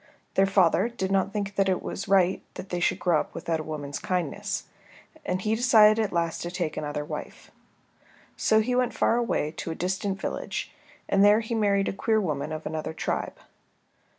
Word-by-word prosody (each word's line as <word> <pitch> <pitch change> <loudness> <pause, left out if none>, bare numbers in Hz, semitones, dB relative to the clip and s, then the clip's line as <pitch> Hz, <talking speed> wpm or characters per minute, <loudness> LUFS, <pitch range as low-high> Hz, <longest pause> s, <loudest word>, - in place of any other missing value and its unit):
Their 195 0 +4
father 190 +1 +3
did 195 -5 -3
not 195 0 +2
think 205 -1 -3
it 190 -2 +2
was 195 - -5
right 190 -1 +3
that 190 - -8
they 175 - -2
should 175 - +1
grow 170 -4 +2
up - - -6
without 165 -1 -2
a - - -4
woman's 145 -2 -5
kindness, 185 +3 -2 0.6
and 180 0 -1
he 215 - +1
decided 220 -2 +5
at 205 - -2
last 170 -1 -1
to 175 - -3
take 175 -3 -3
another 150 0 -3
wife. - - -8 0.8
So 220 0 +3
he 250 +3 -1
went 245 -2 +1
far 230 - +2
away 230 -10 0
to - - -4
a 160 - -3
distant 190 +2 -2
village - - -4 0.3
and 195 0 +3
there 210 +2 +6
he 225 +1 -5
married 200 -3 +2
a - - -1
queer 220 +3 +1
woman 155 -6 -2
of 155 0 -5
another 160 0 -4
tribe. - - -3
190 Hz, 190 wpm, -26 LUFS, 165-210 Hz, 0.8 s, there